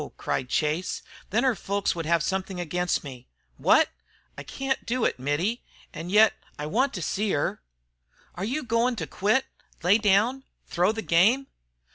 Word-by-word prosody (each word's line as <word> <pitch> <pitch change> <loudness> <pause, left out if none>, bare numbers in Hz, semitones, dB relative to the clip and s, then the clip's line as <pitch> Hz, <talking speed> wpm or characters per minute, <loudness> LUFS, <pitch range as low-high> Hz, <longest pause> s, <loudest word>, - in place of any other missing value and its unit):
cried 125 - -2
Chase. 155 +6 -1 0.3
"Then 225 +5 +1
her 260 -2 +3
folks 200 0 -1
would 165 -2 -4
have 170 -2 +2
something 190 +1 -2
against 175 +1 -1
me." 130 -4 -10 0.3
"Wot?" - - +5 0.5
"I - - -7
can't 270 0 -3
do 245 0 0
it, - - 0
Mittie, 160 - -1 0.3
and 170 - -6
yet 215 +1 +6 0.2
I 150 - -4
want 255 - +1
to 180 - -3
see 210 +5 -1
her 145 - -1 0.4
" 60 0 -35
"Are 180 - -5
you 260 +9 -2
goin' 235 +1 +1
to - - -3
quit, 215 +7 +1 0.4
lay 195 +5 +5
down, 215 +6 +2 0.2
throw 180 +4 +1
the 220 0 -5
game?" 215 +11 +4
195 Hz, 170 wpm, -26 LUFS, 170-230 Hz, 0.5 s, yet